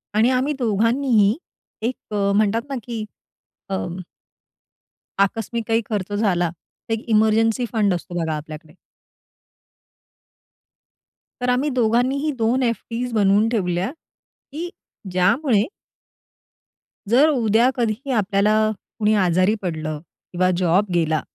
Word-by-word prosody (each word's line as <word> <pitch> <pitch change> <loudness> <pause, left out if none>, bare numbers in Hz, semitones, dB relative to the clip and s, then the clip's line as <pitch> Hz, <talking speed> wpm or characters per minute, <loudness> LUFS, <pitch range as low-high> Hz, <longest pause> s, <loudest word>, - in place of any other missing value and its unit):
आणि 225 +4 +4
आम्ही 260 +4 +1
दोघांनीही 230 -1 +2 0.5
एक 250 - -1 0.2
अ, 200 -1 +1
म्हणतात 215 +2 +2
ना, 275 - -3
की 230 -2 -5 0.7
अं 185 -2 -3 1.2
आकस्मिक 225 +3 0
काही 225 +1 +2
खर्च 205 -2 -3
झाला, 185 -5 +1
तर 175 +6 -9
एक 225 - -3
इमर्जन्सि 220 +2 +3
फंड 205 -4 +2
असतो 175 0 -5
बघा 160 -1 -1
आपल्याकडे. 155 +1 -9 2.7
तर 250 - 0
आम्ही 255 +4 +1
दोघांनीही 255 +4 +1
2 235 +4 +1
एफडीस 235 +1 -2
बनवून 205 0 +3
ठेवल्या, 185 -1 -1
की 325 +1 -11 0.4
ज्यामुळे 205 - +2 1.4
जर 275 +7 +5
उद्या 235 -3 +3
कधीही 240 +3 -2
आपल्याला, 205 +2 +2 0.4
कुणी 215 0 +3
आजारी 185 +5 +3
पडलं 155 -4 -3 0.3
किंवा 185 +1 +1
जॉब 185 +3 +3
गेला 160 -3 +1
215 Hz, 110 wpm, -22 LUFS, 190-240 Hz, 2.7 s, जर